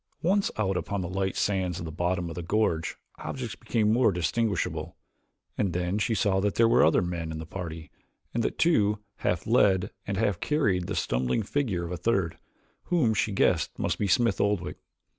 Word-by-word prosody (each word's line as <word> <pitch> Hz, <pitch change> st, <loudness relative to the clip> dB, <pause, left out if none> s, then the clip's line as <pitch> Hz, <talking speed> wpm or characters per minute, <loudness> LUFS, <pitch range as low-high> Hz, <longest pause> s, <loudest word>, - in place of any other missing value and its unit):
Once 195 Hz, +4 st, +2 dB
out 95 Hz, -3 st, 0 dB
upon 100 Hz, +1 st, -2 dB
the 90 Hz, -, -3 dB
light 95 Hz, +1 st, -2 dB
sands 95 Hz, -4 st, 0 dB
of 85 Hz, -, -5 dB
the 80 Hz, -, -5 dB
bottom 90 Hz, +2 st, -1 dB
of 85 Hz, -, -5 dB
the 90 Hz, -, -5 dB
gorge 85 Hz, -3 st, 0 dB, 0.2 s
objects 125 Hz, -4 st, -5 dB
became 110 Hz, -2 st, +1 dB
more 120 Hz, -2 st, +4 dB
distinguishable, 95 Hz, +4 st, -1 dB, 0.6 s
and 95 Hz, -4 st, +1 dB
then 90 Hz, +3 st, -1 dB
she 110 Hz, +1 st, +1 dB
saw 95 Hz, -2 st, +2 dB
that 100 Hz, +1 st, 0 dB
there 115 Hz, -, +5 dB
were 115 Hz, -, +5 dB
other 80 Hz, +3 st, +4 dB
men 85 Hz, -2 st, -3 dB
in 80 Hz, -, -5 dB
the 80 Hz, -, -6 dB
party 80 Hz, -2 st, -7 dB, 0.4 s
and 120 Hz, -, 0 dB
that -, -, -2 dB
two 105 Hz, -11 st, +3 dB, 0.2 s
half 90 Hz, -1 st, -1 dB
led 100 Hz, -4 st, +3 dB, 0.2 s
and 100 Hz, -1 st, -2 dB
half 100 Hz, -4 st, +1 dB
carried 100 Hz, -, +1 dB
the 100 Hz, -, -3 dB
stumbling 65 Hz, -, 0 dB
figure 100 Hz, -8 st, -1 dB
of 85 Hz, -, -6 dB
a 90 Hz, -, -3 dB
third, 95 Hz, -2 st, 0 dB, 0.5 s
whom 155 Hz, -11 st, +2 dB
she 110 Hz, 0 st, 0 dB
guessed 90 Hz, -4 st, +1 dB
must -, -, -1 dB
be 105 Hz, -, +1 dB
Smith 100 Hz, 0 st, +2 dB
Oldwick. 100 Hz, -4 st, 0 dB
95 Hz, 195 wpm, -27 LUFS, 85-110 Hz, 0.6 s, there